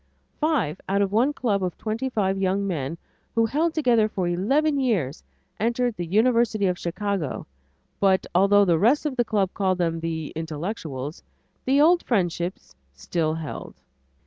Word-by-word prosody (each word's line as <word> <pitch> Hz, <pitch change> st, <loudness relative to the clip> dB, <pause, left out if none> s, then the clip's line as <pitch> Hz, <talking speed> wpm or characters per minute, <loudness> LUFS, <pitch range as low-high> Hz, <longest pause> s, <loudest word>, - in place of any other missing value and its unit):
Five 270 Hz, -, 0 dB
out 200 Hz, +1 st, +2 dB
of 195 Hz, -, -2 dB
one 240 Hz, +7 st, +3 dB
club 215 Hz, -9 st, -1 dB
of 180 Hz, -3 st, -3 dB
twenty 225 Hz, +4 st, -3 dB
five 195 Hz, -5 st, 0 dB
young 195 Hz, +1 st, +1 dB
men 165 Hz, -4 st, -3 dB, 0.4 s
who 230 Hz, 0 st, +4 dB
had 225 Hz, -, -6 dB
held 320 Hz, +3 st, +1 dB
together 240 Hz, -8 st, +3 dB
for 185 Hz, -4 st, -2 dB
eleven 275 Hz, -, +1 dB
years, 185 Hz, -, -1 dB, 0.4 s
entered 235 Hz, +2 st, 0 dB
the 175 Hz, -3 st, -4 dB
University 220 Hz, +1 st, +2 dB
of 180 Hz, -1 st, 0 dB
Chicago 185 Hz, -3 st, -3 dB, 0.5 s
but 190 Hz, -1 st, +3 dB
although 200 Hz, +3 st, +5 dB
the 170 Hz, -3 st, +3 dB
rest 250 Hz, -, +3 dB
of 290 Hz, -3 st, -1 dB
the 240 Hz, -, +2 dB
Club 205 Hz, -4 st, 0 dB
called 190 Hz, -2 st, 0 dB
them 165 Hz, -2 st, 0 dB
the 160 Hz, -2 st, -4 dB
"intellectuals," 155 Hz, -, -5 dB, 0.4 s
the 270 Hz, +2 st, +3 dB
old 340 Hz, +4 st, +5 dB
friendships 175 Hz, -5 st, -2 dB, 0.2 s
still 155 Hz, -, -1 dB
held. 160 Hz, -3 st, -7 dB
200 Hz, 160 wpm, -24 LUFS, 175-235 Hz, 0.5 s, although